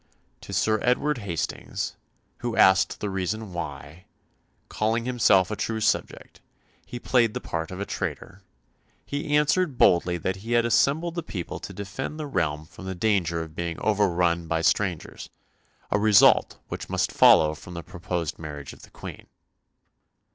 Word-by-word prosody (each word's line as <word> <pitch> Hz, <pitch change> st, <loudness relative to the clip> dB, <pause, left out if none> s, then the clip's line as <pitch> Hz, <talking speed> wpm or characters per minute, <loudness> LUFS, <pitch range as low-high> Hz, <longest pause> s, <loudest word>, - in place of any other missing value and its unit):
To -, -, -10 dB
Sir 110 Hz, -1 st, +1 dB
Edward 130 Hz, +3 st, +1 dB
Hastings, 90 Hz, -7 st, -4 dB, 0.4 s
who 120 Hz, -1 st, -3 dB
asked 95 Hz, 0 st, +4 dB
the 105 Hz, -, -2 dB
reason 95 Hz, +2 st, -3 dB
why, 80 Hz, 0 st, -7 dB, 0.6 s
calling 115 Hz, +2 st, -1 dB
himself 110 Hz, -6 st, +3 dB
a -, -, -1 dB
true 110 Hz, +1 st, -2 dB
subject, 110 Hz, -, -2 dB, 0.4 s
he 125 Hz, -, -8 dB
played 120 Hz, -2 st, +2 dB
the -, -, -1 dB
part 80 Hz, -1 st, -4 dB
of 95 Hz, -, -7 dB
a 100 Hz, -, -2 dB
traitor, -, -, -5 dB, 0.6 s
he 145 Hz, +1 st, 0 dB
answered 150 Hz, -1 st, +1 dB
boldly 90 Hz, 0 st, +4 dB
that 95 Hz, +3 st, -2 dB
he 115 Hz, +5 st, -4 dB
had 120 Hz, 0 st, +3 dB
assembled 150 Hz, +8 st, +2 dB
the 170 Hz, -, -3 dB
people 95 Hz, -, -6 dB
to -, -, -8 dB
defend 100 Hz, -, -6 dB
the 155 Hz, -, -3 dB
realm 80 Hz, -, -1 dB
from 95 Hz, -, -12 dB
the 95 Hz, 0 st, -4 dB
danger 90 Hz, -5 st, 0 dB
of 80 Hz, -1 st, -11 dB
being 85 Hz, -1 st, -4 dB
overrun 90 Hz, -5 st, +1 dB
by 80 Hz, 0 st, -1 dB
strangers, 95 Hz, -2 st, -1 dB, 0.6 s
a 105 Hz, -, +2 dB
result 105 Hz, -1 st, +5 dB
which -, -, -6 dB
must -, -, 0 dB
follow 75 Hz, -1 st, +6 dB
from 90 Hz, +3 st, -11 dB
the 85 Hz, -, -6 dB
proposed 85 Hz, -2 st, -4 dB
marriage 75 Hz, -3 st, -7 dB
of -, -, -16 dB
the -, -, -15 dB
Queen. -, -, -10 dB
95 Hz, 160 wpm, -25 LUFS, 85-115 Hz, 0.6 s, follow